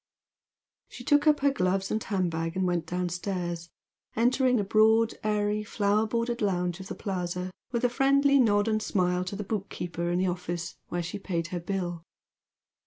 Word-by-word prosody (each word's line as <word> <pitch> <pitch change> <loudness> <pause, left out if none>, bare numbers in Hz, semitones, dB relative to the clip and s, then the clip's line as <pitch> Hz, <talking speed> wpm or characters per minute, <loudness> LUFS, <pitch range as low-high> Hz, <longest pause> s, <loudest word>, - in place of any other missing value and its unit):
She - - -10
took 290 +1 +3
up 300 -2 +4
her 280 0 +4
gloves 195 -5 0
and 215 - -1
hand 185 -4 0
bag 165 +1 -3
and 190 - +1
went 175 -2 0
downstairs, 175 -1 -3 0.5
entering 250 +2 +3
the 210 - +2
broad, 220 +2 +4
airy 210 0 0
flower 210 0 +1
bordered 235 +1 -1
lounge 180 -3 0
of 190 - -8
the - - -5
Plaza 180 -1 -3 0.2
with 235 -1 -1
a - - +6
friendly 275 +2 +4
nod 205 -3 +3
and 215 -1 +1
smile 180 -3 +1
to 185 - -4
the 210 - -4
book 200 0 -3
keeper 170 -1 -3
in 175 - +1
the 185 - +1
office 175 -1 -3
where 175 0 -2
she 170 +4 -5
paid 170 -4 -3
her 180 -2 -3
bill. 175 -1 -3
195 Hz, 180 wpm, -28 LUFS, 175-220 Hz, 0.5 s, a